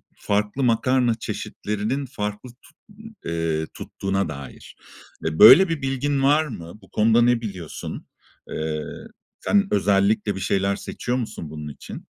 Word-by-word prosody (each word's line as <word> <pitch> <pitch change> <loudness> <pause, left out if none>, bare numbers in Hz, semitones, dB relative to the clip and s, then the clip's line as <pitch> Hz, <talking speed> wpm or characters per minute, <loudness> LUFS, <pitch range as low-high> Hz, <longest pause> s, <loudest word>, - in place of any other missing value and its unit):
farklı 105 +6 -1
makarna 125 0 +2
çeşitlerinin 110 +4 -3
farklı 105 -2 -5
tut 120 +2 -20 0.5
eee, 80 -1 -1
tuttuğuna 95 0 -3
dair. 70 -2 -9 0.5
E, 80 0 -2
böyle 180 - +10
bir 165 -3 -2
bilgin 135 +1 0
var 150 +3 +4
mı? 100 - -9
Bu - - -19
konuda 115 +2 +4
ne 120 0 +3
biliyorsun? 95 -8 -7 0.4
Eee, 80 -1 -3 0.6
sen 205 -1 +2
özellikle 100 +1 +2
bir - - -5
şeyler 95 +1 +1
seçiyor 125 +5 -3
musun 110 -10 -5
bunun 75 0 -7
için? - - -10
105 Hz, 135 wpm, -23 LUFS, 95-125 Hz, 0.6 s, böyle